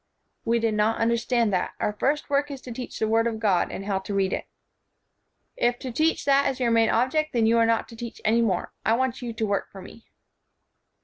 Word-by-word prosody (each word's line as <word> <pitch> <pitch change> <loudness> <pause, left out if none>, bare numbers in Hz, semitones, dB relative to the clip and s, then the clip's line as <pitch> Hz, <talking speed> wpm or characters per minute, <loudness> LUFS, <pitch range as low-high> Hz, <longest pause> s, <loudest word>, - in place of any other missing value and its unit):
"We 230 +1 +2
did 225 -1 0
not 210 +1 +1
understand 235 -1 +1
that. 180 - -1
Our 210 - 0
first 285 +8 0
work 285 +1 +1
is 275 -2 -6
to 250 - -9
teach 250 +2 -6
the 220 - 0
Word 225 +1 +2
of 225 -1 -3
God, 200 -5 +1
and 195 - -6
how 195 -2 0
to 195 +1 -5
read 190 -1 +1
it." - - -4 1.1
"If 240 0 +1
to 255 -1 -6
teach 315 +7 +1
that 280 0 +4
is 265 - -4
your 240 -2 +1
main 230 -1 +4
object, 280 +6 +1
then 230 -2 +2
you 230 +1 +4
are 230 - +4
not 230 0 +1
to 230 - -11
teach 235 0 -8
any 225 +2 +3
more. 190 -6 -1
I 220 - +2
want 260 0 -1
you 240 -1 -4
to 220 -1 -2
work 200 -1 -1
for 195 - -11
me." 210 +4 -13
230 Hz, 235 wpm, -25 LUFS, 215-250 Hz, 1.1 s, that